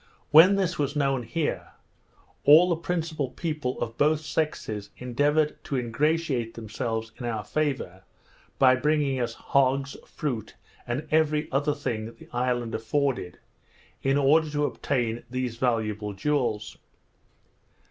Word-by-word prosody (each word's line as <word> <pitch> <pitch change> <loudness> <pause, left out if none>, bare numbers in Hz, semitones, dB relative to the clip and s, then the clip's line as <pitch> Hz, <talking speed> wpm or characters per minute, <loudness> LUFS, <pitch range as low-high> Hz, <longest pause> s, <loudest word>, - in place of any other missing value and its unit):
When 165 +6 +8
this 185 -4 -1
was 145 0 -1
known 135 -3 +1
here, 145 +7 -3 0.7
all 160 +5 +7
the 170 - +2
principal 165 -4 -2
people 150 -5 -3
of 115 0 -4
both 155 +1 +3
sexes 150 -10 -3
endeavoured 145 +5 0
to 140 - -3
ingratiate 130 0 0
themselves 115 0 -4
into 120 -2 -4
our 110 -2 -3
favour 130 -9 -2 0.6
by 130 -1 +6
bringing 145 -1 +1
us 120 -1 -2
hogs, 135 0 +1
fruit, 120 -8 -4 0.3
and 130 +6 -3
every 155 -1 +2
other 145 +2 +1
thing 115 -5 -4
the - - -15
island 120 -1 -1
afforded, 120 -4 -1 0.6
in 135 +1 +2
order 150 +3 +4
to 145 0 0
obtain 120 -6 -1
these 125 -2 -3
valuable 110 -4 -1
jewels. 110 -2 -1
135 Hz, 125 wpm, -26 LUFS, 115-150 Hz, 0.7 s, When